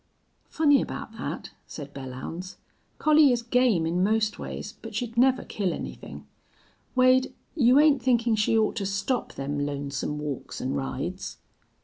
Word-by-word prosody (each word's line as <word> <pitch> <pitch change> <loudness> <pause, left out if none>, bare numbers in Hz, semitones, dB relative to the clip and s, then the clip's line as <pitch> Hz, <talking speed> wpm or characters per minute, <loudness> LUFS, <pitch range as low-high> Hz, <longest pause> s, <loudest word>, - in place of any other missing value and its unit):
"Funny 290 -3 +4
about - - -6
thet," - - -5 0.2
said 145 -2 -8
Belllounds. 135 +7 -7 0.4
"Collie 305 -2 +5
is 240 -1 0
game 235 -8 +2
in 170 +2 0
most 215 +1 +1
ways, - - -6
but - - -8
she'd 235 -2 -3
never 255 +2 +4
kill 195 -4 -2
anythin'.... - - -8 0.7
Wade, 255 +1 +4 0.2
you 255 -3 +5
ain't 295 -3 +5
thinkin' 235 -2 +2
she 215 +1 +2
ought 220 +1 +1
to 200 - -1
stop 200 +6 -2
them 140 +1 -3
lonesome 140 0 -3
walks 150 -3 -5
an' - - -2
rides?" 65 -1 -4
220 Hz, 145 wpm, -26 LUFS, -, 0.7 s, Collie